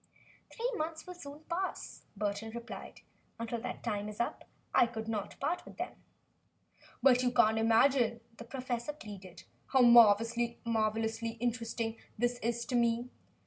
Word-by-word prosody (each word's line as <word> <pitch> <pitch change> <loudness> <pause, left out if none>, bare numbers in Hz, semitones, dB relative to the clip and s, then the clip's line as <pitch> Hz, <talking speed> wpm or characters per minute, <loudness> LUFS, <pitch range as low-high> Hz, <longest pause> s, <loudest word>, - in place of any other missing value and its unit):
"Three 480 +2 -2
months 315 +1 -3
will 360 - -7
soon 290 -4 -10
pass," 350 +4 -4
Burton 205 +1 -2
replied. 235 0 -8 0.4
"Until 230 0 -3
that 250 - -5
time 210 -2 -2
is 210 - -9
up, 235 - -2 0.3
I 240 - +6
could 225 -2 -6
not 215 -3 -4
part 315 +6 -1
with - - -13
them." - - -4 1.1
"But 255 -2 +6
you 250 - +3
can't 220 -2 +4
imagine," 230 +1 +4 0.2
the 235 - -9
professor 255 +1 -3
pleaded, 195 - -10 0.2
"how 265 - +4
marvelously 230 0 +4
interesting 230 -1 -2 0.2
this 240 +2 0
is 235 +1 -1
to 250 - -2
me. 235 +1 +1
235 Hz, 145 wpm, -32 LUFS, 225-250 Hz, 1.1 s, I